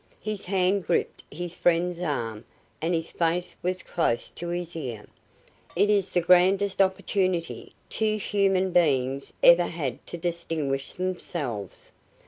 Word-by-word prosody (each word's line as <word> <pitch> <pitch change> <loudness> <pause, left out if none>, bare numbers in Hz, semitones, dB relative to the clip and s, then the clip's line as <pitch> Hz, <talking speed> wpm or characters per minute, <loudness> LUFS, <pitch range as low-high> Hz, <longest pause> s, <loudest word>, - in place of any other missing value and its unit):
His 210 -3 -4
hand 190 0 +1
gripped 170 - 0
his 175 +3 -6
friend's 175 0 +1
arm 115 -9 -2 0.4
and 170 +2 +1
his 165 0 -3
face 175 +1 -1
was 185 +1 -2
close 140 -9 -1
to 175 - -7
his 175 0 -4
ear. 120 -9 -5 0.7
"It 210 - +3
is 200 -2 +2
the 175 - +1
grandest 190 +3 +4
opportunity 185 -2 0 0.2
two 215 -1 0
human 195 -2 +1
beings 135 -5 +2
ever 170 0 +7
had 145 -8 -4
to 175 - -6
distinguish 165 -5 -2
themselves!" 165 - -4
175 Hz, 130 wpm, -26 LUFS, 160-185 Hz, 0.7 s, ever